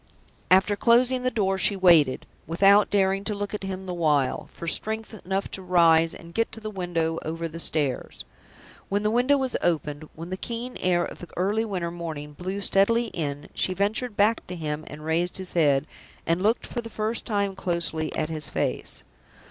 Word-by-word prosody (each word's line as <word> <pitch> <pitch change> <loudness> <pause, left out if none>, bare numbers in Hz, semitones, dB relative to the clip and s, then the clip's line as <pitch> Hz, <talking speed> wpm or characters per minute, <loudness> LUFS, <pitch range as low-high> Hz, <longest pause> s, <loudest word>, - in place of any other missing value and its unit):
After 190 +2 +5
closing 245 +4 +3
the 255 - +1
door, 195 -5 0
she 200 - +3
waited, 170 -8 +4 0.2
without 195 +5 +5
daring 195 -1 +2
to 210 - -1
look 205 +1 -4
at 210 - -3
him 190 0 -5
the 180 - -4
while, 150 -6 +1
for 170 - -8
strength 220 +5 -1
enough 195 +2 -2
to 190 - -5
rise 165 -2 +4
and 170 0 -12
get 230 +3 0
to - - -6
the 215 -1 -6
window 170 -4 -1
over 165 +1 -3
the 165 +1 -8
stairs. 150 -5 -1 0.6
When 205 +1 0
the 215 - +2
window 250 +5 +3
was 265 -2 -2
opened, 155 -3 -1
when 165 +3 -8
the 185 - -2
keen 240 +4 -5
air 175 -1 +2
of - - -9
the 175 - -9
early 205 +5 +1
winter 180 -5 -3
morning 160 -4 -6
blew 185 +5 -4
steadily 230 +5 +3
in, 145 -4 -4
she 185 - +1
ventured 210 +4 -1
back 215 +2 +2
to 180 - -5
him 155 -2 -4
and 150 +2 -9
raised 170 +3 0
his 190 -1 -6
head, 145 -4 +3 0.4
and 170 +2 +1
looked 220 +4 +1
for 240 - -4
the 230 - -9
first 220 +1 -3
time 200 -3 0
closely 170 -4 -2
at - - -1
his 155 -1 -3
face. - - -3
185 Hz, 195 wpm, -25 LUFS, 165-210 Hz, 0.6 s, After